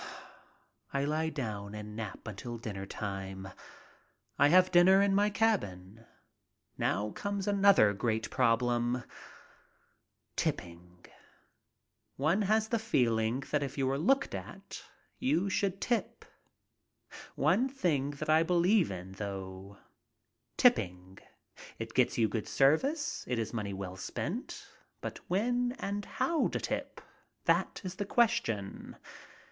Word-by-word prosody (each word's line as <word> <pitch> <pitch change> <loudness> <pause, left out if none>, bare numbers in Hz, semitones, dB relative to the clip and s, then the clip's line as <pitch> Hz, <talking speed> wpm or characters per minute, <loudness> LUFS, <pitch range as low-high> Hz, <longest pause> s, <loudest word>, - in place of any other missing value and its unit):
I 140 0 0
lie 155 +2 0
down 105 -8 -5
and 105 0 -7
nap 110 0 -6
until 115 +3 -6
dinner 100 -4 -6
time. 95 -2 -5 0.9
I 145 - +7
have 185 +4 +5
dinner 185 +2 +7
in 200 0 +3
my 205 +1 +3
cabin. 115 - -1 0.7
Now 105 +4 0
comes 200 - -3
another 200 - +5
great 110 +2 -1
problem. 120 0 +1 1.3
Tipping. 90 +1 -4 1.1
One 160 +9 +2
has 215 +2 +2
the 230 - +1
feeling 120 - +1
that 150 - +2
if 140 0 -4
you 135 -1 +1
are 135 - 0
looked 270 - +2
at - - -8 0.4
you 200 -7 +1
should 195 0 0
tip. 235 -2 -2 1.1
One 185 - +2
thing 160 - 0
that 145 +1 -6
I 155 +1 +5
believe 180 +3 +3
in, 90 0 -7
though 95 0 -7 0.4
— - - -50
tipping. 90 +1 +2 0.6
It - - -6
gets - - +2
you 115 - +4
good 110 +1 -3
service. 275 - +2
It 125 - -1
is 115 0 -3
money 100 -4 -3
well 95 -1 -6
spent. - - -5 0.3
But - - -6
when 245 +6 +1
and 200 +1 -3
how 335 -2 0
to - - -3
tip - - -4 0.2
— - - -45
that - - +1
is 185 -1 -4
the 205 - -2
question. 210 - 0
135 Hz, 130 wpm, -31 LUFS, -, 1.3 s, I